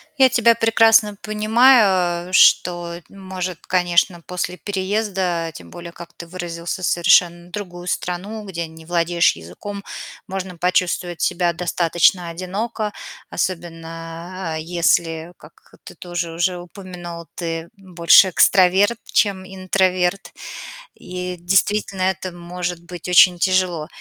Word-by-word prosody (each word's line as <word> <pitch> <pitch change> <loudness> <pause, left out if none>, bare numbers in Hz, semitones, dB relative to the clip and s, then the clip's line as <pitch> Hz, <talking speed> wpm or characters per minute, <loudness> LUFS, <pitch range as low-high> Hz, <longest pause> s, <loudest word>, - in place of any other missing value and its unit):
Я 265 -3 +5
тебя 235 -1 +4
прекрасно 225 -2 +4
понимаю, 210 -5 +3
что 175 -2 +4
н 195 - -15
может, 185 -2 -6
конечно, 175 -1 +1
после 180 +1 -4
переезда, 190 -2 -2
тем - - -12
более, 175 -1 -9
как 170 0 -12
ты 170 - -10
выразился, 175 0 -5
совершенно 175 0 +3
другую 175 -3 -7
страну, 190 +5 -4
где 170 -3 -4
не 160 0 -14
владеешь 170 - +2
языком, 90 - -9 0.4
можно 190 -2 -6
почувствовать 180 0 -1
себя 175 -1 +1
достаточно 175 0 +1
одиноко, 205 +5 -4 0.4
особенно, 165 0 -5
а, - - -3
если, 165 0 0
как - - -19
ты - - -11
тоже 175 -2 -5
уже 175 +2 -1
упомянул, 175 -2 -9
ты 165 -1 -4
больше 185 0 +5
экстраверт, 195 +5 +4
чем 195 -3 0
интроверт, 185 0 -1 0.6
и 180 0 -6
действительно 195 +2 0
это 185 0 -1
может 175 0 -5
быть 175 -1 -9
очень 180 0 +6
тяжело. 180 -4 0
180 Hz, 115 wpm, -20 LUFS, 170-190 Hz, 0.6 s, очень